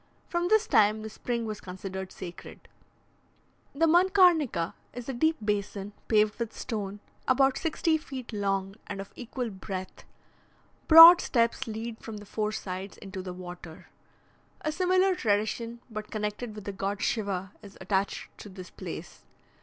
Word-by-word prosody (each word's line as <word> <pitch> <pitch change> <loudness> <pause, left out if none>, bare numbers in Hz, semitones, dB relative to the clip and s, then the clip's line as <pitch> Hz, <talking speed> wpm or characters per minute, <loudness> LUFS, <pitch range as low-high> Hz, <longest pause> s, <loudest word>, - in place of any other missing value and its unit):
From 345 0 -1
this 435 +3 +4
time 215 +1 +3
the 220 - -6
spring 235 +1 -3
was 215 -1 -5
considered 190 0 -6
sacred. 175 -1 -10 1.1
The 325 +4 +3
Mankarnika 345 - +4 0.2
is 245 0 -7
a 270 - -3
deep 315 +6 +2
basin, 205 -1 -2
paved 215 0 +3
with 230 -1 -4
stone, 205 -4 -4 0.3
about 270 0 +4
sixty 320 0 0
feet 260 -6 -8
long, 195 -1 -1
and 205 -1 -5
of 195 - -8
equal 245 -1 -5
breadth; 190 -1 -7 0.8
broad 330 +2 +11
steps 235 +1 +1
lead 225 +1 -5
from 225 -2 -8
the 205 - -10
four 210 +1 -2
sides 190 -1 -6
into 195 -2 -7
the 185 0 -6
water. 175 -2 -10 0.7
A 305 - -1
similar 370 +3 +3
tradition, 230 - -1
but 215 -3 -7
connected 210 +1 -4
with 210 - -8
the 200 - -4
god 195 +1 -3
Shiva, 195 -4 -1
is 200 -1 -13
attached 190 +1 -2
to 210 - -9
this 185 -1 -10
place. - - -8
215 Hz, 150 wpm, -28 LUFS, 195-260 Hz, 1.1 s, broad